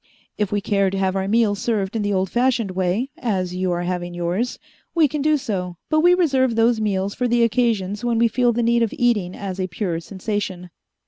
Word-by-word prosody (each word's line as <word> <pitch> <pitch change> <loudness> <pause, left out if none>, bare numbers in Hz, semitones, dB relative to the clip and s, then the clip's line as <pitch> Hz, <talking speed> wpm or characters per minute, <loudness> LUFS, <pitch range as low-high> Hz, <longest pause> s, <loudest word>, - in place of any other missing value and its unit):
If 210 -2 -1
we 205 0 0
care 200 -2 +1
to 195 - -3
have 190 0 0
our 190 0 -1
meals 210 -1 +2
served 210 -3 -1
in 225 - 0
the 205 0 -1
old 190 -1 0
fashioned 240 -4 +1
way, 190 +8 -1
as 190 -7 -1
you 185 0 -1
are 175 0 -1
having 175 -1 -3
yours, 175 +8 -2 0.4
we 325 -3 +5
can 295 +1 -3
do 305 +1 +3
so, 180 -8 -4
but 310 - +4
we 350 +3 +5
reserve 265 -9 +2
those 230 0 +3
meals 200 -1 -1
for 250 - -1
the 240 0 +3
occasions 225 -3 0
when 240 -1 +1
we 235 +1 +4
feel 245 +1 +2
the 235 +1 0
need 235 +1 +3
of 230 - 0
eating 210 -7 +1
as 195 -2 -5
a 185 - -1
pure 170 -1 -3
sensation. 190 -1 -4
205 Hz, 220 wpm, -21 LUFS, 185-240 Hz, 0.4 s, we